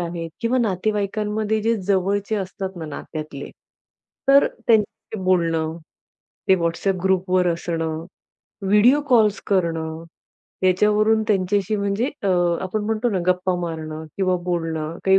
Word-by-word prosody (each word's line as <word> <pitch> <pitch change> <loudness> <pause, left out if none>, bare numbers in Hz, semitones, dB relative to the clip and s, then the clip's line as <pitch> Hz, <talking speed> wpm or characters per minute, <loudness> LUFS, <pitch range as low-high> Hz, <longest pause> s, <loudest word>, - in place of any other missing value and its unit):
आहेत 170 -1 -4
किंवा 240 +2 +1
नातेवाईकांमध्ये 210 +1 0
जे 230 +1 +2
जवळचे 200 +2 +1
असतात 190 -1 -5
ना, 160 - -6
नात्यातले. 150 -1 -7 0.8
तर 280 +1 +7
त्यांच्याशी 220 -1 -1
बोलणं, 165 -3 +1 0.7
ते 190 - +7
WhatsApp 175 +3 0
ग्रुपवर 185 -1 +2
असणं, 165 -1 -3 0.6
व्हिडिओ 210 +8 +5
कॉल्स 220 -5 +4
करणं. 165 -4 -1 0.6
याच्यावरून 210 +4 +3
त्यांच्याशी 200 +1 +1
म्हणजे 200 +5 0
अ, 200 - 0 0.3
आपण 205 +3 -2
म्हणतो 220 +2 0
ना, 195 - 0
गप्पा 185 0 +1
मारणं 160 -2 -5
किंवा 185 -2 +1
बोलणं, 165 -2 -2
काही 190 0 +5
190 Hz, 120 wpm, -22 LUFS, 170-210 Hz, 0.8 s, तर